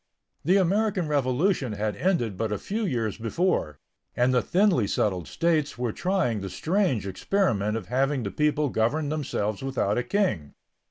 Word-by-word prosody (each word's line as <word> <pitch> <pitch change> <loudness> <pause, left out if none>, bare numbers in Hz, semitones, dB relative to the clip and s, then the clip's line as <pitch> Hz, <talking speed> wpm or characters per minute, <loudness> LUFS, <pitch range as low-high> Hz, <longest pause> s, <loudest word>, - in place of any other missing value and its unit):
The 185 +6 +4
American 195 -1 +1
Revolution 140 - +1
had 105 +1 -2
ended 145 - 0
but 110 +2 -2
a 105 - 0
few 215 - -3
years 115 - -2
before, 115 - 0 0.4
and 125 +1 +2
the 125 - +3
thinly 180 - +2
settled 95 -6 0
states 155 - 0
were 120 -2 -1
trying 170 - 0
the 95 - -5
strange 135 - 0
experiment 105 - 0
of 110 - -6
having 135 +1 +1
the 100 - -3
people 150 -1 +1
govern 140 +7 0
themselves 110 -9 -2
without 135 -2 0
a - - -1
king. 125 - -1
130 Hz, 160 wpm, -26 LUFS, 110-175 Hz, 0.4 s, The